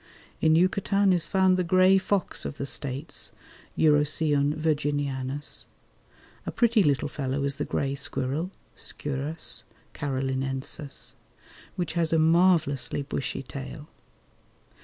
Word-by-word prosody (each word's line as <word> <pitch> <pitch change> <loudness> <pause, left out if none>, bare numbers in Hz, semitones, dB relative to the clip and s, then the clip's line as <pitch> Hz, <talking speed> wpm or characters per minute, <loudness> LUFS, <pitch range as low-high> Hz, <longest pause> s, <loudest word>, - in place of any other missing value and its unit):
In 160 0 +5
Yucatan 195 +2 +3
is 175 -3 +2
found 190 -1 +3
the 180 - +1
grey 185 +2 +5
fox 195 0 0
of 140 - -5
the 140 - -3
States 140 0 -2 0.5
(Urocyon 150 -1 +3
virginianus). 145 -3 -1 0.8
A - - -1
pretty 235 -2 +3
little 145 -6 +2
fellow 140 -1 -2
is 140 0 0
the - - -2
grey 135 -1 -1
squirrel 140 +4 -2 0.3
(Sciurus 145 +3 -3 0.3
carolinensis), 135 +1 -3 0.6
which 175 -2 -2
has 165 -2 +1
a 165 - +4
marvellously 160 -4 +3
bushy 135 -1 -3
tail. 140 +3 -8
145 Hz, 115 wpm, -27 LUFS, 140-170 Hz, 0.8 s, In